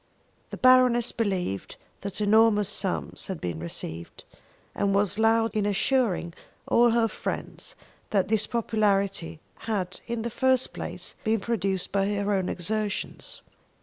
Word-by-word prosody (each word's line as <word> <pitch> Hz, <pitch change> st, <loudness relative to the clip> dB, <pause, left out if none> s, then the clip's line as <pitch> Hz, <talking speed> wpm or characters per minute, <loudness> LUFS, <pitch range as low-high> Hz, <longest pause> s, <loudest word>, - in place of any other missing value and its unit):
The -, -, -7 dB
Baroness 250 Hz, -2 st, +5 dB
believed 185 Hz, -, -2 dB, 0.2 s
that 200 Hz, +1 st, -5 dB
enormous 210 Hz, -1 st, +4 dB
sums 195 Hz, -2 st, -2 dB
had 190 Hz, -4 st, -4 dB
been 85 Hz, -3 st, -4 dB
received, 85 Hz, 0 st, -7 dB, 0.5 s
and 200 Hz, -1 st, 0 dB
was 205 Hz, 0 st, +1 dB
loud 225 Hz, 0 st, +3 dB
in 210 Hz, -1 st, +1 dB
assuring 205 Hz, -4 st, +1 dB, 0.3 s
all 240 Hz, 0 st, +5 dB
her 230 Hz, 0 st, +3 dB
friends -, -, -6 dB, 0.3 s
that 195 Hz, -3 st, +1 dB
this 215 Hz, 0 st, +1 dB
popularity 200 Hz, -7 st, 0 dB, 0.3 s
had 190 Hz, -4 st, -2 dB
in 235 Hz, -1 st, -3 dB
the 235 Hz, -, -3 dB
first 260 Hz, +1 st, +2 dB
place -, -, -5 dB
been 220 Hz, 0 st, +1 dB
produced 195 Hz, -4 st, -1 dB
by 195 Hz, -1 st, +1 dB
her 205 Hz, 0 st, 0 dB
own 190 Hz, -2 st, 0 dB
exertions. 210 Hz, -, -4 dB
210 Hz, 135 wpm, -26 LUFS, 195-230 Hz, 0.5 s, Baroness